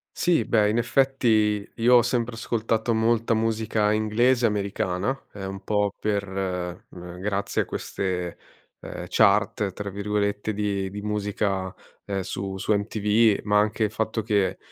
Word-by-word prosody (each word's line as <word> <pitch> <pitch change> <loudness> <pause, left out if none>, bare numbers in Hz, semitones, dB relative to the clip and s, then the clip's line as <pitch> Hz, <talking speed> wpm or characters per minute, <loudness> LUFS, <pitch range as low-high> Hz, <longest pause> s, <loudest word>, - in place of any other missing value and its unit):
Sì, 175 -1 +2
beh, 105 -2 +2
in 110 - 0
effetti, 115 -5 +2
io 120 +2 +4
ho 120 - +8
sempre 120 0 -1
ascoltato 115 0 -1
molta 115 +1 +2
musica 110 -1 +1
inglese 120 +3 +2
e - - +6
americana, 100 +3 -1 0.2
ehm, 95 -1 -6
un 95 0 -8
po' 105 -1 0
per, 100 -2 -1 0.6
mhmm, 90 0 -10
grazie 100 0 -1
a - - -2
queste, 90 -2 -3 0.4
uhm, - - -7
"chart" 105 0 +3
tra 100 +2 -6
virgolette 105 +1 -1
di 100 -2 -1
di 105 +2 -7
musica 100 -2 -2 0.3
e 95 -2 -3
su 95 +1 -4
su 105 - 0
MTV, 105 +1 +2
ma 105 0 +3
anche 105 +1 +1
il 105 - 0
fatto 110 0 -1
che, 105 -3 +1
105 Hz, 150 wpm, -25 LUFS, 100-115 Hz, 0.6 s, ho